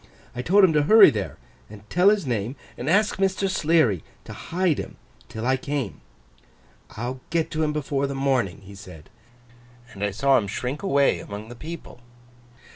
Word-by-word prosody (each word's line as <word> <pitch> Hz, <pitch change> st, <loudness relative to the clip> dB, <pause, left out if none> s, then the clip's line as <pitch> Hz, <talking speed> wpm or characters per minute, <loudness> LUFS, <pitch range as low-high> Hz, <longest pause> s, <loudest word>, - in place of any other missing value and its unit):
I 125 Hz, -, -3 dB
told 195 Hz, +9 st, +4 dB
him 180 Hz, -4 st, +5 dB
to 150 Hz, -, +3 dB
hurry 215 Hz, +7 st, +7 dB
there, 105 Hz, -4 st, -4 dB, 0.3 s
and 105 Hz, 0 st, -13 dB
tell 180 Hz, +3 st, +5 dB
his 205 Hz, -5 st, +1 dB
name, 120 Hz, 0 st, -2 dB, 0.2 s
and 130 Hz, -, -4 dB
ask 205 Hz, +4 st, +2 dB
Mr. 195 Hz, 0 st, 0 dB
Sleary 155 Hz, -, +2 dB, 0.2 s
to -, -, -9 dB
hide 175 Hz, -3 st, -1 dB
him -, -, -7 dB, 0.3 s
till 110 Hz, +1 st, -6 dB
I 130 Hz, +1 st, +2 dB
came. 140 Hz, -5 st, -4 dB, 1.0 s
"I'll 125 Hz, +3 st, -4 dB
get 165 Hz, -2 st, -1 dB
to 160 Hz, -, -2 dB
him 155 Hz, -1 st, +1 dB
before 140 Hz, -2 st, -2 dB
the 140 Hz, -, -5 dB
morning," 130 Hz, -9 st, 0 dB
he 100 Hz, +1 st, -13 dB
said. 90 Hz, -6 st, -13 dB, 0.8 s
And 100 Hz, -, -6 dB
I 105 Hz, -, +1 dB
saw 135 Hz, +7 st, +3 dB
him 100 Hz, -, -4 dB
shrink 125 Hz, +7 st, -4 dB
away 140 Hz, -8 st, +2 dB
among 105 Hz, +2 st, -8 dB
the 120 Hz, -, -9 dB
people. 160 Hz, 0 st, -9 dB
135 Hz, 180 wpm, -24 LUFS, 110-165 Hz, 1.0 s, hurry